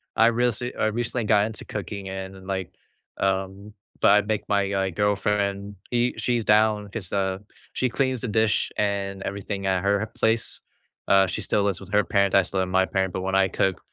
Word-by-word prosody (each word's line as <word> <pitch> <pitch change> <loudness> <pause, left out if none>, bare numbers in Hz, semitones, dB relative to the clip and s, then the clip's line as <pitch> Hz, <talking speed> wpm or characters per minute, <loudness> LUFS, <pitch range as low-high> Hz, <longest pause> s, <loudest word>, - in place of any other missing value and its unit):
I 115 - +5
rece 120 +1 0
I - - +2
recently 120 +2 -1
got 105 -1 +4
into 110 - -8
cooking 100 -1 -6
and 95 0 -7
like, 95 -2 -3 0.4
um 95 +2 -2 0.3
but - - +5
I 105 +1 +6
make 105 0 -3
my, 100 -1 +2
uh, 95 -1 0
girlfriend, 100 +1 0
he 120 0 +1
she's 120 -2 0
down 105 -1 +3
'cause, 100 -3 -5
uh, 95 -1 0 0.3
she 130 - 0
cleans 130 0 0
the - - -3
dish 110 0 +1
and 100 -1 -1
everything 100 0 -4
at 95 -2 +1
her 100 +1 +2
place. 110 0 0 0.5
Uh, 95 0 +5
she 90 - -3
still 100 - +1
lives 100 -3 0
with 95 -1 -12
her 105 0 +4
parents, 100 -1 +2
I 100 - +7
still 95 +2 -3
live 95 - 0
with - - -7
my 95 0 +5
parent, 95 -1 -1
but 95 - -3
when 95 +1 -1
I 95 0 +4
cook, 95 0 0
100 Hz, 200 wpm, -25 LUFS, 95-110 Hz, 0.5 s, I